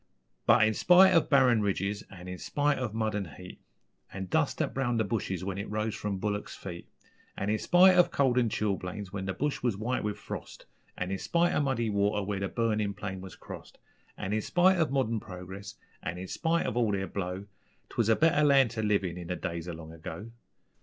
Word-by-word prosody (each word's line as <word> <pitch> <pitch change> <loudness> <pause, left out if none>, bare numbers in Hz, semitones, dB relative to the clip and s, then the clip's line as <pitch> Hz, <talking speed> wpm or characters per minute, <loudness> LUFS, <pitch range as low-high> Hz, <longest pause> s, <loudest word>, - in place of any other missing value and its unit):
But - - +6
in 110 - +1
spite 185 - +6
ov 165 - +3
barren 130 -6 +5
ridges 100 0 -1
an' 90 -2 -11
in 90 -1 -6
spite 145 0 0
ov 125 -5 -2
mud 110 -1 0
an' 95 -8 -4
heat, 90 0 -11 0.5
An' 95 -1 -5
dust 90 - 0
that - - -1
browned 120 -3 0
the - - +3
bushes 95 -3 -2
when 95 0 -3
it 100 - -5
rose 110 +1 -1
from 105 -2 -3
bullicks' 105 +1 -3
feet, 85 -3 -8 0.5
An' 100 +2 -1
in 110 - 0
spite 185 +1 +6
ov 180 -1 +5
cold 130 -3 +2
and 120 -2 +2
chilblains 100 -2 -3
when 100 -1 -3
the 95 - -1
bush 145 +6 -1
was 120 -6 0
white 120 +5 -1
with 105 -1 -2
frost, - - -8 0.3
An' 90 +1 -3
in 95 - -2
spite 170 0 +1
of - - +2
muddy 120 -5 0
water 100 0 +1
where 100 0 -2
the 100 - -1
burnin' 110 -2 0
plain 95 -2 -5
was 95 0 -9
crossed, - - -11 0.4
An' 100 - -3
in 110 - +1
spite 180 - +3
of 160 - +2
modern 130 -5 0
progress, 95 +1 -9 0.3
and 85 +2 -4
in 95 +1 -6
spite 165 - 0
of - - -2
all 115 -4 +2
their 95 -1 -1
blow, 95 +1 -4 0.4
'Twas 115 -2 0
a 110 - +6
better 155 +1 +3
land 135 -5 +5
to 115 -1 -3
live 105 -2 +2
in, 90 -1 -4
in 85 - -7
the 90 - -2
days 85 -1 -4
o' - - -4
long 80 0 -9
ago. 80 +7 -8
105 Hz, 220 wpm, -29 LUFS, 95-125 Hz, 0.5 s, But